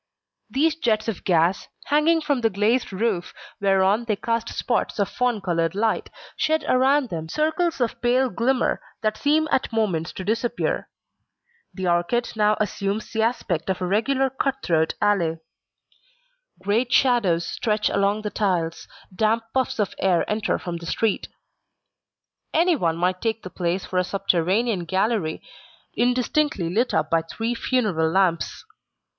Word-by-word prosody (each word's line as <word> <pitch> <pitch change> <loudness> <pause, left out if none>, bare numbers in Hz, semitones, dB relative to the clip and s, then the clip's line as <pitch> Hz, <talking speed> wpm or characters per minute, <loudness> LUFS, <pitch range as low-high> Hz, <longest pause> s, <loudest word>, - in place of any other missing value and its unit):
These 310 +3 +1
jets 220 -8 0
of 220 -5 -3
gas, 175 +1 +2 0.2
hanging 310 +3 +3
from 285 -5 0
the 225 - +3
glazed 220 +5 +1
roof 195 -2 -2 0.2
whereon 195 +3 +2
they 215 -2 0
cast 230 +2 -2
spots 240 - -1
of 200 -2 +1
fawn 245 -4 -1
coloured 165 -2 0
light, 220 +2 0 0.3
shed 315 0 0
around 265 +1 +3
them 160 -3 -5
circles 320 - 0
of 240 -3 -1
pale 250 +2 +3
glimmer 245 +6 +1 0.2
that 215 0 +1
seem 305 +5 +2
at 260 - +1
moments 190 -8 0
to 190 - -6
disappear. 230 +4 -1 0.9
The 190 - -3
arcade 175 +8 +1
now 210 0 +3
assumes 205 0 -2
the 220 - 0
aspect 195 -8 -1
of 190 - 0
a 185 - -2
regular 260 +8 +1
cut 270 +1 -2
throat 160 -2 +1
alley. 180 -6 +1 1.2
Great 215 +6 0
shadows 205 -12 +3
stretch 210 +2 -1
along 200 +2 +1
the 210 - -3
tiles, 175 -5 -1 0.3
damp 220 +3 +2
puffs 260 -1 0
of 210 -3 -1
air 185 -3 +2
enter 215 0 0
from 175 -1 -5
the 170 0 -9
street. 220 +4 0 1.3
Anyone 310 - +2
might 180 +1 0
take 225 -1 -1
the 185 - -8
place 180 +1 -2
for 185 - -1
a - - +2
subterranean 195 +2 0
gallery 190 -2 -1 0.5
indistinctly 245 - +1
lit 240 +5 +1
up 155 0 0
by 165 0 +3
three 225 +8 -3
funeral 210 -10 0
lamps. 180 -1 0
215 Hz, 150 wpm, -23 LUFS, 180-245 Hz, 1.3 s, hanging